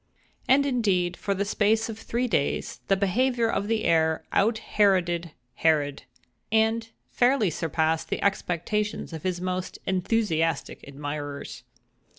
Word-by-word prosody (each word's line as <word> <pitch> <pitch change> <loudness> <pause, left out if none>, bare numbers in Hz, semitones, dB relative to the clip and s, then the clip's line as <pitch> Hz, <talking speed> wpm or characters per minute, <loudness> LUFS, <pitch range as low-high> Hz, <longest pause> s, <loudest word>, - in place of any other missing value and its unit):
And, 280 +2 +5
indeed, 195 -9 +1
for 200 +2 -2
the 200 +1 -1
space 215 +2 +2
of 225 -1 -7
three 245 +3 -1
days, 145 -11 -1
the 195 - +4
behavior 235 +5 +1
of 205 -2 -1
the 220 0 0
heir 160 -1 +2
out 220 +3 +2
Heroded 180 -6 +1 0.3
Herod, 150 -3 +1 0.5
and 225 +1 +2 0.2
fairly 245 -6 +3
surpassed 160 0 -1
the - - -2
expectations 200 +1 -1
of 160 - -6
his 180 0 -2
most 185 0 -3
enthusiastic 185 -5 0
admirers. 145 0 -6
190 Hz, 130 wpm, -26 LUFS, 165-225 Hz, 0.5 s, And